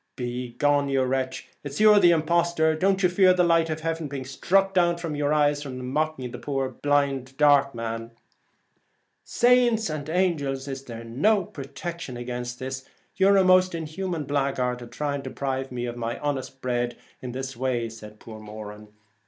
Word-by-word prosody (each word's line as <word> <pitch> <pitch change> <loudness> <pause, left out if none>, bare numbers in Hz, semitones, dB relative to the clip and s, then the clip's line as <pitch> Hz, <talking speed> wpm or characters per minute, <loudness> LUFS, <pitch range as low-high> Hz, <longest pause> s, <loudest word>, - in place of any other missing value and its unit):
1 125 - -3
Begone, 125 +4 0
you 135 -1 +2
wretch! 130 0 -2 0.2
it's 145 -1 -6
you'ze 210 -1 +7
the 175 - +7
imposhterer. 170 0 +2
Don't 190 +4 +1
you - - +7
fear 185 +1 +4
the 180 - +3
light 165 -1 +3
of 155 0 -3
heaven 165 -1 -2
being 135 -2 -6
struck 195 +8 +1 0.2
from 165 -3 -4
your 145 0 0
eyes 145 -1 +2
for 145 - -6
mocking 130 +1 -2
the - - -7
poor 135 -2 -2
dark 140 -1 +2
man? 115 0 -4 0.4
' - - -44 0.2
' - - -48
Saints 240 -5 +3
and 155 -1 -5
angels, 150 -7 0
is 135 0 -6
there 115 -2 -8
no 170 - +2
protection 140 -1 -7
against 125 0 -5
this? 130 +1 -5 0.3
You're 195 +1 +5
a 190 - +5
most 185 -1 +4
inhuman 165 +1 -4
blaguard 135 -3 -1
to 120 - -9
try 145 +3 -3
to - - -6
deprive 135 -1 -3
me 120 -1 -3
of 120 0 -5
my 115 0 -3
honest 135 -2 -4
bread 120 -1 -1 0.2
this 130 +1 -5
way,' 125 -1 -1
replied 110 -2 -9
poor 110 -1 -10
Moran. 105 0 -9
140 Hz, 175 wpm, -25 LUFS, 125-165 Hz, 0.4 s, you'ze